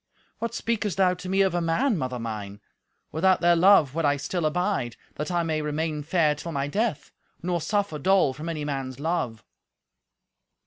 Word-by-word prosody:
"What 230 Hz, 0 st, -3 dB
speakest 220 Hz, -6 st, -1 dB
thou 185 Hz, -2 st, +4 dB
to 185 Hz, +1 st, -7 dB
me 195 Hz, +1 st, +3 dB
of 190 Hz, -2 st, +1 dB
a 175 Hz, -, 0 dB
man, 185 Hz, +10 st, +1 dB
mother 130 Hz, -6 st, -2 dB
mine? 105 Hz, -3 st, -6 dB, 0.5 s
Without 185 Hz, +4 st, +3 dB
their 175 Hz, 0 st, +4 dB
love 170 Hz, -6 st, +5 dB
would 165 Hz, +1 st, -1 dB
I 145 Hz, -1 st, +3 dB
still 160 Hz, +3 st, -1 dB
abide, 180 Hz, -, -1 dB, 0.2 s
that 150 Hz, -, -4 dB
I 175 Hz, -1 st, +1 dB
may 160 Hz, -1 st, -1 dB
remain 150 Hz, 0 st, -2 dB
fair 155 Hz, 0 st, +2 dB
till 160 Hz, +3 st, -7 dB
my 140 Hz, -2 st, -1 dB
death, 200 Hz, -2 st, -2 dB, 0.3 s
nor 175 Hz, -1 st, -1 dB
suffer 200 Hz, -5 st, -1 dB
dole 185 Hz, -3 st, +3 dB
from 155 Hz, +5 st, -6 dB
any 155 Hz, -3 st, -3 dB
man's 135 Hz, -2 st, -4 dB
love." 145 Hz, -8 st, -2 dB
165 Hz, 180 wpm, -26 LUFS, 145-185 Hz, 0.5 s, love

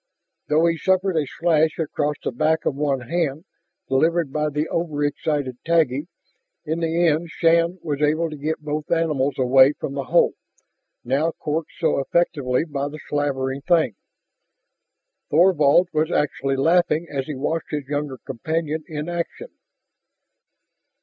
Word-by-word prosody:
Though 155 Hz, +2 st, +3 dB
he 165 Hz, -1 st, +1 dB
suffered 190 Hz, +2 st, +1 dB
a 150 Hz, -3 st, +1 dB
slash 160 Hz, -1 st, +1 dB
across 150 Hz, -2 st, -1 dB
the -, -, -1 dB
back 155 Hz, +6 st, +1 dB
of -, -, +1 dB
one 140 Hz, -2 st, -1 dB
hand, 155 Hz, +3 st, -2 dB, 0.4 s
delivered 160 Hz, +2 st, +1 dB
by 150 Hz, 0 st, 0 dB
the 150 Hz, +2 st, -2 dB
over 155 Hz, -4 st, -1 dB
excited 145 Hz, -3 st, -2 dB
Taggi, 160 Hz, -3 st, +1 dB, 0.6 s
in 160 Hz, +2 st, -2 dB
the 165 Hz, +1 st, +1 dB
end 165 Hz, +1 st, +1 dB
Shann 170 Hz, +2 st, +2 dB
was 150 Hz, -3 st, -3 dB
able 155 Hz, +3 st, +2 dB
to -, -, -6 dB
get 150 Hz, +2 st, -2 dB
both 150 Hz, 0 st, -3 dB
animals 150 Hz, -5 st, +1 dB
away 130 Hz, +2 st, +5 dB
from 140 Hz, -, -6 dB
the 140 Hz, -1 st, -3 dB
hole, -, -, +3 dB, 0.7 s
now 145 Hz, +6 st, 0 dB
corked 155 Hz, +1 st, -3 dB
so 160 Hz, -4 st, +1 dB
effectively 140 Hz, -2 st, 0 dB
by 145 Hz, -3 st, -3 dB
the 150 Hz, -, -8 dB
slavering 135 Hz, -2 st, -1 dB
thing. 160 Hz, -, +2 dB, 1.4 s
Thorvald 170 Hz, 0 st, +4 dB
was 155 Hz, +1 st, +1 dB
actually 135 Hz, -3 st, 0 dB
laughing 165 Hz, +3 st, +2 dB
as 135 Hz, -3 st, -4 dB
he 150 Hz, -, -4 dB
watched 155 Hz, +4 st, -2 dB
his 150 Hz, -2 st, -3 dB
younger 145 Hz, -2 st, -3 dB
companion 155 Hz, +5 st, -3 dB
in 150 Hz, 0 st, -5 dB
action. 175 Hz, -, -4 dB
150 Hz, 145 wpm, -22 LUFS, 140-165 Hz, 1.4 s, away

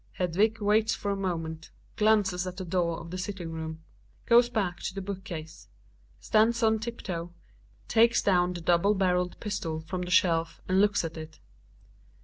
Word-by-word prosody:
Hedvig 200 Hz, +6 st, +1 dB
waits 210 Hz, +1 st, +2 dB
for 200 Hz, -, -3 dB
a -, -, 0 dB
moment, 165 Hz, -4 st, -4 dB, 0.3 s
glances 205 Hz, -4 st, +2 dB
at 180 Hz, 0 st, -6 dB
the 190 Hz, -, -5 dB
door 170 Hz, -1 st, 0 dB
of 170 Hz, 0 st, -10 dB
the 185 Hz, -, -4 dB
sit 195 Hz, +2 st, -4 dB
ting 170 Hz, -3 st, -6 dB
room; 160 Hz, 0 st, -6 dB, 0.4 s
goes 240 Hz, +1 st, +5 dB
back 200 Hz, -7 st, -2 dB
to 185 Hz, -, -5 dB
the 195 Hz, -, -3 dB
hook 190 Hz, 0 st, -11 dB
case, 160 Hz, -3 st, -8 dB, 0.5 s
stands 230 Hz, +2 st, +2 dB
on 220 Hz, 0 st, +3 dB
tip 235 Hz, +2 st, -6 dB
toe, 170 Hz, -1 st, -4 dB, 0.6 s
takes 230 Hz, +1 st, +4 dB
down 180 Hz, -2 st, +2 dB
the 175 Hz, -, -6 dB
double 175 Hz, +5 st, +3 dB
barreled 180 Hz, -2 st, 0 dB
pistol 165 Hz, -7 st, -3 dB
from 175 Hz, +3 st, -5 dB
the 180 Hz, -, -4 dB
shelf 165 Hz, -3 st, +2 dB
and 190 Hz, +1 st, +3 dB
looks 205 Hz, -3 st, +2 dB
at 165 Hz, 0 st, -6 dB
it. 155 Hz, 0 st, -9 dB
185 Hz, 180 wpm, -28 LUFS, 170-210 Hz, 0.6 s, goes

